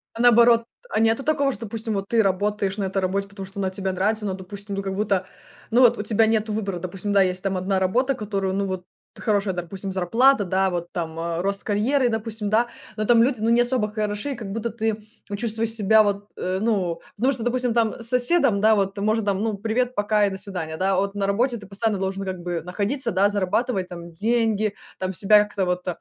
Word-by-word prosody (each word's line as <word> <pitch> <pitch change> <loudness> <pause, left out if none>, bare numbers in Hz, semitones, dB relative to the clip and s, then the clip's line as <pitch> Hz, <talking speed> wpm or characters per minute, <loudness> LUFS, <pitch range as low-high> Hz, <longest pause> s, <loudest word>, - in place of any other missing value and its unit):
А, 230 - -3
наоборот, 235 -1 +6 0.2
а - - 0
нету 225 +4 +2
такого, 285 -2 +1
что, 245 - -9
допустим, 220 +1 -3
вот 195 0 -3
ты 230 -1 +3
работаешь 200 0 0
на 205 - -1
этой 195 0 -1
работе, 195 +2 -1
потому 200 -1 -8
что 195 +1 -9
она 190 -1 -1
тебе 190 0 -3
нравится, 210 +4 0
но, 195 - -1
допустим, 200 +2 -7
ну, 195 - -3
как 195 0 -3
будто, 195 -2 0 0.5
ну 245 +3 +4
вот 240 -1 +6
у 210 - -3
тебя 220 +1 +2
нету 220 -1 0
выбора. 200 -4 -2
Допустим, 185 +3 -4
да, 200 - +5
есть 185 0 -1
там 195 -1 -1
1 190 +1 0
работа, 245 +9 +1
которую, 200 -5 -2
ну, 200 +1 0
вот, 185 -1 -4 0.3
хорошая, 205 -3 0
допустим, 185 +2 -5
зарплата, 225 +7 +3
да, 190 +1 +1
вот 175 -1 -4
там, 165 -2 -4
э, 170 0 -2
рост 200 +1 -1
карьеры, 245 +5 +1
допустим, 220 -2 -3
да. 230 +3 +3 0.3
Но 215 0 -2
там 230 0 +5
люди, 250 -3 0
ну, 225 - +1
не 235 +1 +5
особо 240 -3 +1
хороши, 210 +5 -2
и - - -3
как 215 -4 -7
будто 225 +3 -2
ты 220 -2 -2 0.3
вот 200 -1 -4
чувствуешь 225 0 -1
себя 220 0 +4
вот, 205 0 -2
э, 185 +1 -2
ну, 190 -7 0
потому 260 +3 +2
что, 240 -3 -5
допустим, 245 0 0
там 225 -2 +2
с 230 - 0
соседом, 250 -3 +3
да, 220 +1 +5
вот, 195 -1 0
может, 215 +1 +1
там, 200 -1 0
ну, 215 -2 -1
"привет, 240 +4 -1
пока 205 0 +2
и - - 0
до 190 - -6
свидания", 180 -5 -5
да. 190 +2 +1
А - - +1
вот 200 +1 -1
на 200 -1 -1
работе 235 +5 +1
ты 210 - -11
постоянно 205 +2 -1
должен 190 +1 -2
как 185 -1 -4
бы 175 -1 -3
находиться, 210 - -1
да, 200 +1 +3
зарабатывать 205 +1 0
там 170 -1 -9
деньги, 220 +1 +1 0.3
там, 185 0 -2
себя 210 +3 +5
как-то 205 -2 -2
вот, 180 0 -2
205 Hz, 235 wpm, -23 LUFS, 190-225 Hz, 0.5 s, наоборот